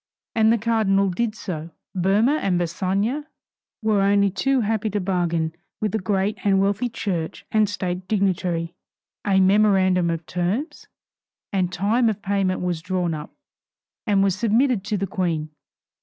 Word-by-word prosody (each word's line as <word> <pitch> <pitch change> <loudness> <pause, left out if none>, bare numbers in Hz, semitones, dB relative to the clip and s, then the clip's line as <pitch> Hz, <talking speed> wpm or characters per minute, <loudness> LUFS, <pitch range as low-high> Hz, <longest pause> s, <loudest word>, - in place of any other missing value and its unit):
And 220 0 +4
the 230 - +4
cardinal 205 -4 +2
did 220 +3 -1
so. 165 -6 -5 0.2
Boehmer 205 - +2
and 180 -3 +1
Bassange 195 - -1 0.6
were 215 -2 +2
only 200 0 +3
too 260 +8 +1
happy 220 0 0
to 205 0 -1
bargain 170 -4 0 0.3
with 215 -2 -1
the 220 - 0
great 195 +2 -1
and 195 -2 +3
wealthy 200 +5 +1
church 180 -8 -4
and 215 -2 +3
state 185 -2 -3
dignitary. 180 -5 0 0.5
A 195 -1 +4
memorandum 190 -2 +4
of 165 -1 -3
terms 200 - -3 0.7
and 185 -2 +1
time 215 +7 +2
of 210 -2 -4
payment 195 -2 0
was 175 -3 -2
drawn 180 -2 -1
up, 150 0 -6 0.8
and 200 -2 +3
was 195 -1 +2
submitted 230 +1 +2
to 210 0 -1
the 195 - -1
Queen. 170 -6 -2
195 Hz, 150 wpm, -23 LUFS, 180-215 Hz, 0.8 s, And